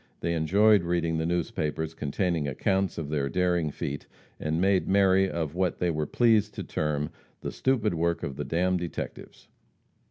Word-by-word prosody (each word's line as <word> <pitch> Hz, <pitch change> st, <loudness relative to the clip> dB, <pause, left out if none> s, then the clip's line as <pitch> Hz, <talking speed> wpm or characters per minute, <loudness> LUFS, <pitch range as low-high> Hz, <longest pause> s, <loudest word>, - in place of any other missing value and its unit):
They 85 Hz, -, 0 dB
enjoyed 100 Hz, +6 st, +4 dB
reading 85 Hz, -2 st, 0 dB
the 80 Hz, -, -1 dB
newspapers 80 Hz, -2 st, -2 dB
containing 80 Hz, +1 st, -1 dB
accounts 95 Hz, +6 st, 0 dB
of 75 Hz, -3 st, -4 dB
their 70 Hz, -2 st, -1 dB
daring 90 Hz, -2 st, +1 dB
feat, 70 Hz, 0 st, -5 dB, 0.3 s
and 80 Hz, +1 st, -1 dB
made 95 Hz, 0 st, +2 dB
merry 95 Hz, -1 st, +4 dB
at 80 Hz, -4 st, -3 dB
what 90 Hz, 0 st, 0 dB
they 90 Hz, -1 st, +1 dB
were 75 Hz, -2 st, -2 dB
pleased 110 Hz, -2 st, +3 dB
to -, -, -4 dB
term 75 Hz, -1 st, -2 dB, 0.3 s
"the -, -, -4 dB
stupid 120 Hz, -7 st, +1 dB
work 85 Hz, +1 st, 0 dB
of 70 Hz, -, -4 dB
the -, -, -3 dB
d 80 Hz, -, -3 dB
d 90 Hz, 0 st, +2 dB
detectives." 85 Hz, -1 st, -6 dB
85 Hz, 170 wpm, -27 LUFS, 80-95 Hz, 0.3 s, enjoyed